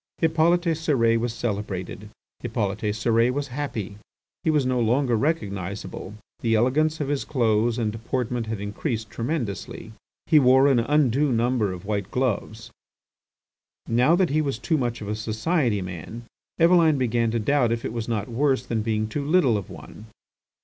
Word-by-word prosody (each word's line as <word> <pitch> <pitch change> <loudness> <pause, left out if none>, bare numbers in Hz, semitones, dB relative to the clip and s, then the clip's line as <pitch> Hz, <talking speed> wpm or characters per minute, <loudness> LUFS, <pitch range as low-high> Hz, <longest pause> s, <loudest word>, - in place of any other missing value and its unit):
Hippolyte 165 +2 +3
Cérès 150 -9 +2
was 120 0 -1
celebrated; 105 -2 -4 0.3
Hippolyte 105 -3 -2
Cérès 115 +2 +2
was 140 +1 -3
happy. 120 -7 -4 0.5
He - - +1
was 150 -4 +2
no 130 -1 +1
longer 120 +2 +2
recognisable; 100 - -3 0.2
the 115 -1 +1
elegance 150 +7 +2
of 145 - -2
his 145 -1 -1
clothes 115 -3 +1
and 110 -3 0
deportment 115 +1 -3
had 110 -2 -3
increased 110 +2 -4
tremendously. 115 - -4 0.3
He 155 -3 +5
wore 130 +1 +5
an 135 -4 +4
undue 140 +2 +2
number 120 -3 +1
of 90 +1 -8
white 100 -2 -2
gloves. 115 -3 -2 1.2
Now 125 +8 +3
that 180 -4 +1
he 155 +2 +2
was 140 -3 -2
too 165 - -1
much 120 -2 -2
of 105 - -6
a 105 - -2
society 110 - 0
man, 90 +6 -7 0.4
Eveline 165 -3 +5
began 120 -2 +1
to 115 +1 -1
doubt 125 +1 +2
if 115 0 -2
it - - -4
was 115 -2 -4
not 110 -3 -2
worse 135 +3 0
than 115 -2 -1
being 110 -1 -1
too 140 +6 -3
little 145 -6 +3
of 100 -4 -4
one. 110 - -11
120 Hz, 165 wpm, -24 LUFS, 110-140 Hz, 1.2 s, He